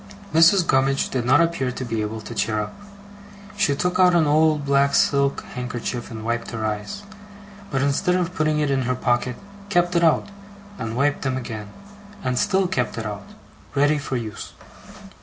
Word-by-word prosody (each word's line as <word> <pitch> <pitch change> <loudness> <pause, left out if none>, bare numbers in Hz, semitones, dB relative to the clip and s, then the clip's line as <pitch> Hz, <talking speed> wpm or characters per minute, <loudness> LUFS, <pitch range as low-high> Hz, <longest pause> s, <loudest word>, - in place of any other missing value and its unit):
Mrs. 165 +3 +6
Gummidge 135 -1 +2
did 125 -3 -1
not 140 +6 +5
appear 165 -7 0
to 130 - -5
be 115 -2 -2
able 110 +1 -4
to 120 - -8
cheer 110 0 0
up. 105 0 -4 0.8
She 175 -9 +2
took 180 +5 -1
out 180 -1 +6
an 165 -2 +4
old 155 0 +3
black 140 0 +3
silk 140 -1 +2
handkerchief 125 -1 -4
and 110 -1 -7
wiped 115 0 -2
her 110 -2 -4
eyes; 110 - -4 0.7
but 135 -1 0
instead 160 +6 +1
of 180 -1 -1
putting 155 -3 +1
it 150 -2 +1
in 135 -1 +1
her 130 - +1
pocket, 125 0 0 0.3
kept 175 -2 +2
it 170 - +3
out, 165 +4 +3 0.5
and 115 0 -4
wiped 145 +2 +1
them 130 -1 -1
again, 110 -4 -6 0.5
and 125 -1 0
still 195 -2 +2
kept 125 -12 -2
it 115 - -4
out, 100 -1 -6 0.5
ready 145 +2 +3
for 135 -2 -3
use. 110 -3 -7
135 Hz, 180 wpm, -23 LUFS, 120-160 Hz, 0.8 s, Mrs